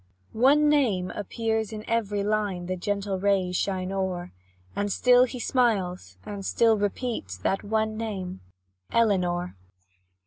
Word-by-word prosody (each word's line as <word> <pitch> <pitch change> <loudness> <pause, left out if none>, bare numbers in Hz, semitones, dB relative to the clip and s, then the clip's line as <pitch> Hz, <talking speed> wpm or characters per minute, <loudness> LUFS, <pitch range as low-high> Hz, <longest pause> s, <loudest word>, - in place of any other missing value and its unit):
One 280 +6 +4
name 230 -12 +2
appears 220 +1 -2
in 215 0 -7
every 210 -3 0
line 205 -4 -1
The 185 +1 -2
gentle 200 +1 -2
rays 190 -2 +1
shine 185 0 -1
o'er, 185 -2 -2 0.4
And 205 0 -1
still 250 +4 +5
he 250 0 -7
smiles 190 - 0
and 200 -1 -6
still 225 +3 +3
repeats 205 - -3
That 190 - -1
one 220 +1 -1
name 195 -5 -4 0.5
Elinor. 180 - +1
205 Hz, 130 wpm, -26 LUFS, 185-225 Hz, 0.5 s, still